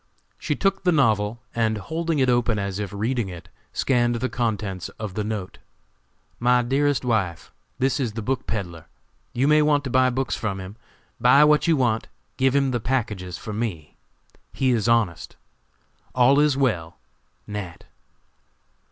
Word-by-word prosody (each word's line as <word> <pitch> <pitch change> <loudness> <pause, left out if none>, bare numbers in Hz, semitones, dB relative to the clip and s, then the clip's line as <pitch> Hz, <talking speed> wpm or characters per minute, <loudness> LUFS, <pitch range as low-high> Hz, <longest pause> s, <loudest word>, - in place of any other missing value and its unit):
She 150 - -1
took 195 +3 0
the 180 - +2
novel, 115 - +1
and, 110 -2 0
holding 160 - -2
it 130 -2 +3
open 120 -3 +2
as 100 -1 -3
if 100 -3 -4
reading 110 +1 -1
it, 85 -2 -10 0.2
scanned 120 -2 +1
the 130 +2 -2
contents 105 -6 -2
of 105 -3 -5
the 105 - -2
note: 105 -3 -5 0.8
"MY 125 +1 +3
DEAREST 140 +2 +1
WIFE: 100 -8 -1 0.3
This 135 +2 +1
is 120 -6 -1
the 115 0 -5
book 130 +2 -2
peddler. 85 -7 -4 0.5
You 130 +3 +1
will 150 0 +5
want 145 -1 +2
to 130 - -5
buy 130 0 +4
books 130 +1 -1
from 100 -3 -3
him. 95 +2 -8 0.4
Buy 130 +4 +6
what 150 +2 +4
you 165 -2 +4
want. 120 -4 +1 0.3
Give 130 0 +2
him 135 -1 +2
the 120 - 0
packages 105 -8 -2
for 110 - -7
me. 100 -9 -4 0.6
He 130 -1 +1
is 115 -2 +1
honest. 110 -8 0 0.8
"All 130 +3 +5
is 150 -2 +3
well. 90 -12 -1 0.5
NAT." 100 -5 -7
120 Hz, 160 wpm, -24 LUFS, 105-135 Hz, 0.8 s, Buy